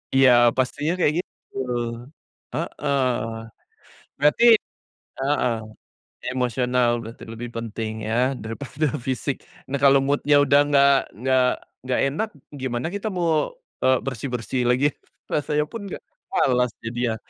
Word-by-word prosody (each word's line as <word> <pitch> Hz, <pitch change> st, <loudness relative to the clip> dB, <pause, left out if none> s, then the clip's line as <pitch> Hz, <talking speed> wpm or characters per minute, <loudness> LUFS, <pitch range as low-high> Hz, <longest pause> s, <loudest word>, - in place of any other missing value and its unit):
Iya, 135 Hz, -1 st, +7 dB, 0.3 s
pastinya 145 Hz, +5 st, 0 dB
kayak 150 Hz, -, +3 dB
gitu. -, -, -11 dB, 1.0 s
Heeh. 140 Hz, -1 st, -1 dB, 1.2 s
Berarti 150 Hz, +11 st, +4 dB, 0.7 s
heeh, 135 Hz, -3 st, +1 dB, 0.8 s
emosional 125 Hz, -1 st, +1 dB
berarti 115 Hz, +1 st, -9 dB
lebih 120 Hz, +1 st, -6 dB
penting 110 Hz, -1 st, -4 dB
ya, 110 Hz, -, -1 dB, 0.3 s
daripada 135 Hz, +6 st, -3 dB, 0.2 s
fisik. 130 Hz, +1 st, -1 dB, 0.3 s
Nah, 140 Hz, +1 st, -2 dB
kalau 140 Hz, 0 st, +7 dB
mood-nya 145 Hz, +1 st, +3 dB
udah 145 Hz, 0 st, +5 dB
nggak 140 Hz, -1 st, +6 dB, 0.2 s
nggak 130 Hz, 0 st, +3 dB, 0.4 s
nggak 130 Hz, -, 0 dB
enak, 180 Hz, +11 st, -1 dB, 0.3 s
gimana 130 Hz, -1 st, -3 dB
kita 205 Hz, +2 st, -2 dB
mau, 170 Hz, -4 st, +1 dB, 0.3 s
eee, 130 Hz, -1 st, +4 dB
bersih-bersih 125 Hz, 0 st, -2 dB
lagi 130 Hz, +4 st, +3 dB, 0.4 s
rasanya 150 Hz, 0 st, 0 dB
pun 225 Hz, +5 st, -7 dB
nggak -, -, -7 dB, 0.3 s
malas 125 Hz, -8 st, +2 dB
jadinya. 115 Hz, 0 st, -2 dB
130 Hz, 115 wpm, -23 LUFS, 125-145 Hz, 1.2 s, Iya